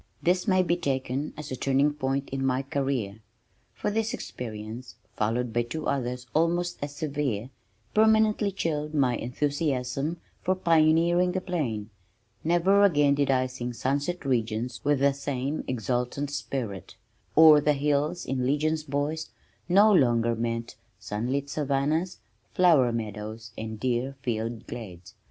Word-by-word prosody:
This 180 +4 +2
may 185 -2 +4
be 175 0 +1
taken 135 -2 -2
as 150 -2 -7
a - - -1
turning 135 +3 +2
point 135 -1 -2
in 135 0 -2
my 130 0 +1
career, 135 -7 -2 0.6
for - - -2
this 220 +1 -1
experience 115 +1 -7 0.2
(followed 115 +2 -1
by 120 - +2
two 150 +7 -5
others 125 -2 -2
almost 175 +2 +1
as 145 0 -5
severe) 140 -6 -2 0.4
permanently 220 -1 +4
chilled 155 -4 -2
my 130 -4 +3
enthusiasm 140 +3 -1 0.2
for 185 - +1
pioneering 170 +1 +3
the 185 - 0
plain. 125 - -3 0.5
Never 175 +5 +3
again 145 -7 +4
did 140 -1 +1
I 130 -1 +3
sing 125 -1 -5
"Sunset 145 +8 -2
Regions" 120 -1 -1
with 145 -1 +2
the 140 0 +4
same 140 +1 -3
exultant 125 +3 -2
spirit. 125 -8 -4 0.4
"O'er 155 -2 +9
the 150 +1 +3
hills 150 +4 0
in 130 -1 -1
legions, 155 +4 +1
boys," 150 +3 -2 0.4
no 205 +4 +6
longer 120 -7 +3
meant 115 0 -3 0.2
sunlit 125 +7 -2
savannahs, 150 +5 -1 0.4
flower 160 -9 +5
meadows 110 0 -5
and 110 -1 -6
deer 130 +2 -1
filled 115 -1 -3
glades. 95 -7 -9
140 Hz, 140 wpm, -27 LUFS, 120-155 Hz, 0.6 s, O'er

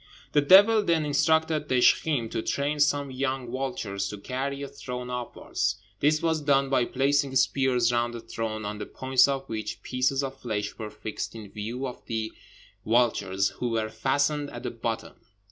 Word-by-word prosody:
The 145 - +4
devil 205 +8 +7
then 165 -5 +1
instructed 155 +1 +2
Dizjkheem 130 -1 +3
to - - -1
train 145 +5 -1
some 145 -1 +2
young 130 -2 -2
vultures 115 -7 -3
to 105 - -6
carry 135 +6 -3
a - - -4
throne 125 -2 -6
upwards; 125 -1 -2 0.2
this 150 +1 +2
was 160 -2 +1
done 140 -2 +2
by 125 -3 +3
placing 140 +1 +1
spears 130 -3 +3
round 120 0 0
the - - -5
throne, 110 -1 -4
on 105 +1 -4
the - - -5
points 130 -1 +3
of 135 -1 -2
which 110 -1 -5
pieces 130 +2 0
of 135 0 -5
flesh 105 -4 -3
were 110 -1 -4
fixed 105 +2 -6
in 105 -3 -9
view 115 +6 -4
of 125 - -7
the 110 -1 -2 0.5
vultures, 105 -5 +2
who 125 - -4
were 110 -1 -1
fastened 140 +6 0
at 120 - -8
the - - -3
bottom. 115 -1 -4
130 Hz, 175 wpm, -27 LUFS, 115-140 Hz, 0.5 s, devil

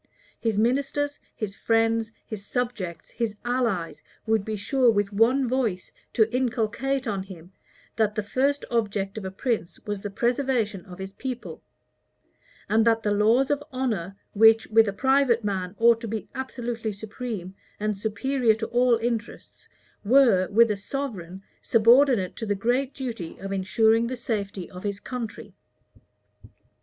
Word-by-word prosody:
His 225 -3 -1
ministers, 280 +5 0 0.2
his 205 -3 -4
friends, 225 0 +1
his 215 -3 -7
subjects, 200 -8 -4
his 225 -3 -2
allies, 235 -9 -1 0.2
would 220 -2 +2
be 215 +1 -3
sure 245 +5 +2
with 205 -2 +1
one 245 +6 +3
voice 235 -7 -1 0.2
to 220 -2 +4
inculcate 255 +2 0
on 200 -4 -2
him, 185 -2 -11 0.5
that 215 -1 +1
the 215 - -1
first 275 +7 0
object 205 -3 -1
of 200 - -8
a - - -2
prince 210 -2 -3
was 205 -2 -3
the 205 - -4
preservation 235 -2 0
of 180 -1 -10
his 190 0 -7
people; 250 +3 -6 1.1
and 220 +1 +3
that 225 0 +2
the 210 - +1
laws 225 +7 +3
of 290 0 0
honor, 215 -8 -2 0.2
which, 225 +1 +6
with 225 0 +6
a - - 0
private 255 +1 +2
man, 190 -2 -2
ought 230 +1 +5
to 230 - -5
be 220 0 -4
absolutely 240 -4 -4
supreme, 205 -2 -6 0.3
and 210 0 -1
superior 220 +4 +1
to 225 +1 -3
all 245 0 +4
interests, 230 0 -5 0.4
were, 225 -5 +5
with 230 +2 +4
a 205 - -1
sovereign, 195 -6 -5 0.2
subordinate 230 -3 +4
to 225 - -4
the 205 - +1
great 245 +6 0
duty 230 -11 -5
of 195 +1 -6
insuring 220 +4 +2
the 255 - -3
safety 200 -6 -3
of 180 - -9
his 200 0 -3
country. 235 -2 -6
225 Hz, 150 wpm, -25 LUFS, 200-245 Hz, 1.1 s, which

